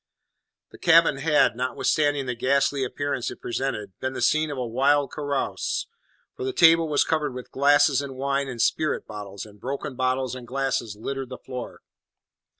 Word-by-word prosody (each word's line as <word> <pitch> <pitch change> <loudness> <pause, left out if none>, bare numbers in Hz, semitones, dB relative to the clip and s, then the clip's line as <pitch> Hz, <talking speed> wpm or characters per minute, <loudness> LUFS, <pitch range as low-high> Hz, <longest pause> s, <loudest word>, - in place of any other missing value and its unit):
The - - -14
cabin 165 -4 +5
had, 150 -3 +3
notwithstanding 140 +3 0
the 125 - -2
ghastly 135 +3 +1
appearance 135 0 -2
it - - -9
presented, 120 -5 -3
been 130 0 -3
the - - -5
scene 155 0 +2
of 145 - -5
a 125 - -2
wild 135 +4 +2
carouse, 145 -2 -2 0.5
for 405 - -6
the 395 - -1
table 165 - +5
was 145 - +3
covered 150 -5 -1
with 125 - -8
glasses 140 0 +4
and 140 -2 -7
wine 140 +1 -1
and 125 -3 -6
spirit 155 +6 +1
bottles, 100 -2 -8
and 105 -1 -16
broken 135 +1 -4
bottles 130 0 0
and 125 -2 -8
glasses 130 -5 -2
littered 135 +4 -5
the 130 - -7
floor. 125 -2 -8
135 Hz, 170 wpm, -25 LUFS, 125-145 Hz, 0.5 s, cabin